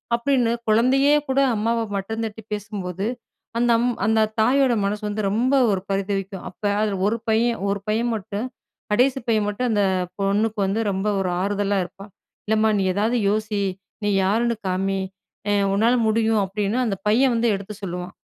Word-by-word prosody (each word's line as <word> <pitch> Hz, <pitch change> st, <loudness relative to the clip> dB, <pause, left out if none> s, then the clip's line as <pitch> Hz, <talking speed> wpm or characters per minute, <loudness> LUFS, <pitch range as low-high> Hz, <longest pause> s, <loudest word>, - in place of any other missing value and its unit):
அப்டின்னு, 245 Hz, -1 st, +1 dB, 0.2 s
குழந்தையே 255 Hz, +6 st, +4 dB, 0.2 s
கூட 265 Hz, +1 st, +2 dB, 0.2 s
அம்மாவ 230 Hz, +2 st, 0 dB, 0.2 s
மட்டந்தட்டி 220 Hz, +2 st, -4 dB
பேசும்போது, 200 Hz, -2 st, -4 dB, 0.5 s
அந்த 240 Hz, 0 st, +3 dB
அம் 245 Hz, +1 st, +2 dB
அந்த 220 Hz, +1 st, +3 dB, 0.2 s
தாயோட 260 Hz, +3 st, +4 dB
மனசு 205 Hz, +2 st, -2 dB
வந்து, 210 Hz, +1 st, -2 dB
ரொம்ப 240 Hz, +7 st, +1 dB, 0.2 s
ஒரு 190 Hz, -2 st, 0 dB
பரிதவிக்கும். 195 Hz, -1 st, -2 dB
அப்ப 190 Hz, -, -22 dB, 0.2 s
அதுல 210 Hz, -2 st, 0 dB
ஒரு 225 Hz, +2 st, 0 dB
பையன் 230 Hz, +1 st, +2 dB
ஒரு 200 Hz, 0 st, -1 dB
பையன் 225 Hz, +3 st, +1 dB
மட்டும், 205 Hz, +2 st, -4 dB, 0.5 s
கடைசி 250 Hz, +5 st, +3 dB
பையன் 215 Hz, -2 st, +2 dB
மட்டும் 240 Hz, +5 st, -1 dB
அந்த 205 Hz, -2 st, +2 dB, 0.4 s
பொண்ணுக்கு 205 Hz, +2 st, 0 dB
வந்து, 195 Hz, +3 st, 0 dB
ரொம்ப 195 Hz, +2 st, -2 dB
ஒரு 185 Hz, -, -1 dB
ஆறுதலா 200 Hz, 0 st, 0 dB
இருப்பான். 195 Hz, +3 st, -11 dB, 0.4 s
"இல்லம்மா 220 Hz, 0 st, +3 dB
நீ -, -, +1 dB
ஏதாவது 220 Hz, +5 st, +1 dB
யோசி. 210 Hz, 0 st, -1 dB, 0.4 s
நீ 205 Hz, -, +1 dB
யாருன்னு 230 Hz, +4 st, +1 dB
காமி. 195 Hz, +1 st, 0 dB, 0.5 s
அ -, -, +2 dB, 0.2 s
உன்னால 225 Hz, +5 st, +3 dB
முடியும்" 220 Hz, -1 st, +2 dB
அப்டின்னு 205 Hz, +4 st, -1 dB
அந்த 200 Hz, -4 st, -1 dB
பையன் 250 Hz, +4 st, +4 dB
வந்து 230 Hz, 0 st, +2 dB
எடுத்து 200 Hz, +2 st, -7 dB
சொல்லுவான். 180 Hz, -1 st, -5 dB
215 Hz, 160 wpm, -23 LUFS, 200-230 Hz, 0.5 s, குழந்தையே